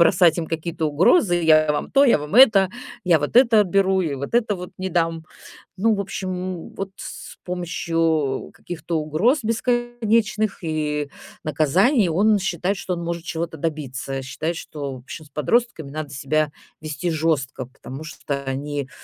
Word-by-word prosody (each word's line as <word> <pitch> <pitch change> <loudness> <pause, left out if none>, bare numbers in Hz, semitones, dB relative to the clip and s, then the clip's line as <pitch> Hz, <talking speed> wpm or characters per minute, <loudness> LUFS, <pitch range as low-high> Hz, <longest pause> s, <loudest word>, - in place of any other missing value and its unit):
бросать 170 -1 +5
им 165 - -2
какие-то 165 0 -2
угрозы: 175 - +4
"Я 155 -2 +4
вам 150 - -3
то, 280 +1 +5
я 250 - +5
вам 150 +5 -6
это, 215 -7 +7 0.3
я 175 -3 +5
вот 145 +8 -2
это 235 -4 +7
отберу 190 -1 +2
и 160 -6 -1
вот 140 +1 -6
это 230 -3 +2
вот 180 -1 -7
не 190 - -2
дам". 165 -2 0 0.5
Ну, 220 +3 +3
в 200 - -1
общем, 185 -2 -4
вот 195 0 -4
с - - -9
помощью 165 -5 -1
каких-то 170 -1 -4
угроз 160 - +2
бесконечных 230 -2 0
и 150 -2 -2 0.3
наказаний 175 - +3
он 205 +6 +3
считает, 190 0 -1
что 185 - -3
он 170 -1 -4
может 170 0 -3
чего-то 165 -1 -4
добиться, 135 -4 -3
считает, 155 +5 -3
что, 140 -5 -6
в - - -8
общем, 145 +5 -9
с - - -19
подростками 160 - 0
надо 150 +1 -5
себя 145 +2 0 0.3
вести 155 +2 -3
жёстко, 150 -5 -1
потому 130 +3 -10
что 140 -2 -5
они, 140 +1 -3
165 Hz, 160 wpm, -22 LUFS, 150-195 Hz, 0.5 s, это